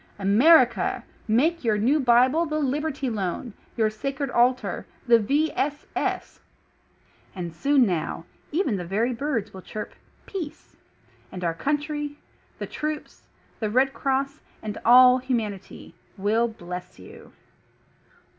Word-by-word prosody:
AMERICA: 240 +7 +4 0.2
make 305 +10 +2
your 220 -3 +2
new 255 +9 +2
bible 260 +6 +4
the 305 0 -2
"Liberty 285 0 -1
Loan," 210 0 -3 0.2
your 220 -2 +2
sacred 275 +4 -4
altar 250 +2 +1
— - - -31
^the 235 -1 +6
"V. 290 +9 +1
S. 290 +1 -2
S - - -2 0.5
!" - - -34
And 175 -3 -5
soon 275 - +3
now, 165 -3 -2 0.3
even 295 - 0
the 180 - -4
very 215 +8 0
birds 235 -4 -2
will 190 - -9
chirp 210 +3 -7 0.3
PEACE. 340 -7 -7 0.6
And 180 -1 -7
our 165 -1 0
Country, 295 - -2 0.4
the - - -4
Troops, 305 0 -5 0.3
the 215 - -1
Red 260 +4 +2
Cross, 275 +2 -1 0.2
and 210 -1 -4
all 250 +1 +7
humanity 225 -7 -4 0.2
,will 215 +4 +2
BLESS 180 -4 -8
YOU. 90 - -14
250 Hz, 135 wpm, -25 LUFS, 210-290 Hz, 0.6 s, all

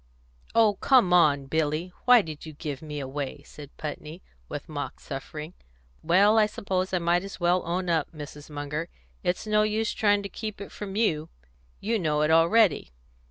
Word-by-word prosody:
"Oh, 220 -3 +4
come 255 -9 +4
now, 170 -5 +5
Billy, 155 +5 -2
why 245 -3 +7
did 155 -3 -8
you 155 - -8
give 145 -2 -6
me 150 -2 -6
away?" 140 +1 -5
said 145 -1 -13
Putney, 155 +2 -7 0.3
with - - -6
mock - - -5
suffering. 150 +4 -7 0.5
"Well, 200 +6 +4
I 210 - +4
suppose 190 -3 -2
I 185 - +1
might 175 +1 +1
as 195 -1 -8
well 175 +1 +2
own 180 +2 -1
up, 165 -2 0
Mrs. 150 -2 -10
Munger; 150 +3 -4 0.3
it's 180 +4 -1
no 210 0 +3
use 215 +1 0
trying 205 -1 +2
to - - -4
keep 215 +2 -6
it 200 - -8
from 200 -2 -7
you; 165 -8 +1 0.5
you 225 +2 0
know 150 -4 +1
it 150 - +2
already. 170 - +4
175 Hz, 175 wpm, -26 LUFS, 150-205 Hz, 0.5 s, why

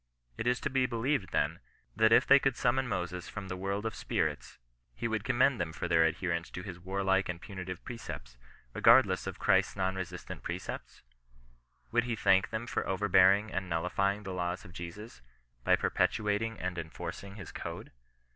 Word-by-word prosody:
Is 125 +2 +2
it - - -11
to - - -1
be 130 -1 +2
believed, 120 -2 -1
then, - - 0 0.4
that 110 0 +4
if - - +6
they 140 - +7
could 135 -2 +1
summon 130 +1 +1
Moses 90 -4 -3
from 100 -1 -7
the 95 - -3
world 100 +3 -3
of 110 - -1
spirits, 80 -10 -2 0.4
he 115 - -2
would 110 -2 -1
commend 130 -1 +3
them 85 -2 -2
for 90 - -3
their 80 -1 +4
adherence 85 +1 -1
to 90 - -7
his 90 -3 -7
warlike 95 +1 0
and 85 -1 -3
punitive 95 -2 -7
precepts, 65 - -7 0.4
regardless 115 -5 +5
of - - -5
Christ's - - +3
non 95 -1 0
resistant 95 -1 -6
precepts - - -6 0.5
% - - -36
Would 120 +1 +2
he 120 -2 -1
thank 95 -3 +3
them 110 +1 -3
for 125 - -2
over 95 +2 0
bearing 100 +4 +5
and 95 -1 -2
nullifying 95 +5 0
the 95 -2 -5
laws 90 0 -3
of 90 - -12
Jesus, 85 - -8 0.4
by - - +5
perpetuat 105 -1 +1
ing 115 0 -3
and 90 -2 -3
enforcing 95 +4 -7
his 95 -6 -9
code - - -7
95 Hz, 185 wpm, -31 LUFS, 90-115 Hz, 0.5 s, they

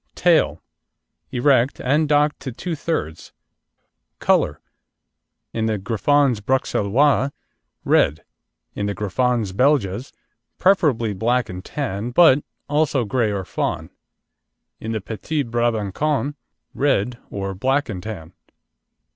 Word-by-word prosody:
TAIL - - +2 0.7
Erect, 130 0 +2
and 150 +4 +1
docked 150 0 +2
to 130 - -6
two 165 +8 -4
thirds. 145 - -4 0.8
COLOUR - - +1 0.9
In 110 -1 -1
the 110 -1 0
Griffons 120 +4 +2
Bruxellois, 130 +3 +2 0.6
red; 75 +3 +3 0.5
in 100 - -3
the 100 - -2
Griffons 110 +1 0
Belges, 125 -1 +1 0.5
preferably 145 - +2
black 120 +5 0
and 90 0 -7
tan, 115 -5 -3
but 145 +1 +5 0.2
also 145 -4 +1
grey 115 0 0
or 100 -2 -3
fawn; - - -3 0.9
in 110 - -5
the 110 -2 -2
Petit 140 +9 -3
Brabancon, 120 +5 -1 0.4
red 125 -3 0
or 95 -1 -4
black 135 +9 0
and 95 -6 -5
tan. 90 -5 -8
120 Hz, 110 wpm, -21 LUFS, 100-145 Hz, 0.9 s, but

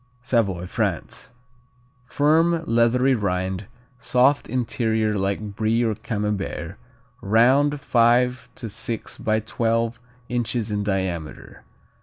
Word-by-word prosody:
Savoy, 100 -9 0
France. - - -3 0.8
Firm, 165 +4 +2
leathery 120 +2 +3
rind, 95 -3 -2 0.3
soft 130 +4 +2
interior 110 -3 0
like 100 +1 -2
Brie 110 +2 +1
or 110 -2 +1
Camembert; 105 -5 -3 0.4
round, 130 +8 +3
five 125 0 +2
to 115 - -6
six 110 +2 -5
by 110 0 +1
twelve 115 +1 -1 0.3
inches 120 -2 -2
in 105 0 -1
diameter. 95 -6 -4
115 Hz, 100 wpm, -23 LUFS, 105-125 Hz, 0.8 s, leathery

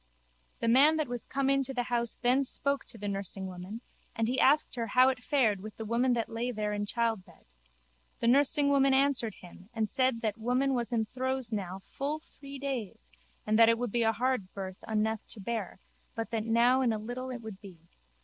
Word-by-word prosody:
The - - 0
man 280 +7 +6
that 310 -2 0
was 245 -1 -4
come 275 0 -1
in 275 0 +3
to 270 0 -3
the 245 - 0
house 235 -1 0
then 255 +3 +4
spoke 280 +1 -1
to 235 - -7
the 205 -1 -5
nursingwoman 195 +1 -4 0.3
and 225 0 0
he 255 +2 0
asked 295 +3 +4
her 235 -2 -2
how 255 +4 +5
it 255 -1 -3
fared 230 -10 +2
with 215 +1 -9
the 220 - -5
woman 240 +3 +2
that 230 -2 -1
lay 230 +2 -3
there 210 -3 -2
in 205 0 -2
childbed. 225 -4 -2 0.7
The - - -1
nursingwoman 280 +1 +4
answered 265 -6 +1
him 180 +2 -15
and 220 -1 0
said 255 0 +1
that 215 -2 0
that - - -31
woman 250 +4 +1
was 240 -3 -1
in 225 -2 +1
throes 260 +1 -3
now 190 -3 -4
full 285 +3 -3
three 280 -3 -11
days 235 - -5 0.3
and 215 +1 +2
that 230 0 +8
it 230 - +3
would 245 -2 -3
be 240 - +1
a 225 -1 +4
hard 235 -4 -1
birth 190 -1 -7
unneth 220 0 0
to 220 - -4
bear 205 -2 -4 0.4
but 225 0 -4
that 220 -2 -2
now 240 +3 +4
in 245 -3 +2
a 220 - -1
little 245 +4 -5
it 245 -2 -6
would 215 -3 -9
be. 190 -4 -12
235 Hz, 215 wpm, -30 LUFS, 215-260 Hz, 0.7 s, that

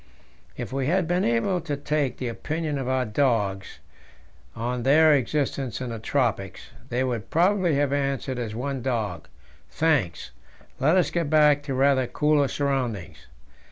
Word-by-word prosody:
If - - -6
we 135 -1 -1
had 180 +1 +1
been 180 +2 +1
able 120 +11 +1
to 150 -3 -3
take 145 -3 -1
the 125 - -4
opinion 150 +5 -3
of 130 - -4
our 130 -1 +1
dogs 105 -5 0 0.8
on 120 +2 -3
their 155 +5 +5
existence 135 -3 -1
in 125 -2 -4
the 115 - -5
tropics, 110 -6 -2 0.2
they 125 +2 0
would 120 -5 -3
probably 180 -1 +2
have 140 0 +1
answered 135 -2 -1
as 110 -3 -4
one 135 +2 -3
dog: 115 -8 -3 0.4
"Thanks, 145 - 0 0.5
let 155 +7 +3
us 180 - +2
get 170 -4 -1
back 150 -2 +5
to 140 -2 -4
rather 135 -1 +3
cooler 150 0 +2
surroundings." 130 -10 -3
135 Hz, 155 wpm, -25 LUFS, 120-150 Hz, 0.8 s, their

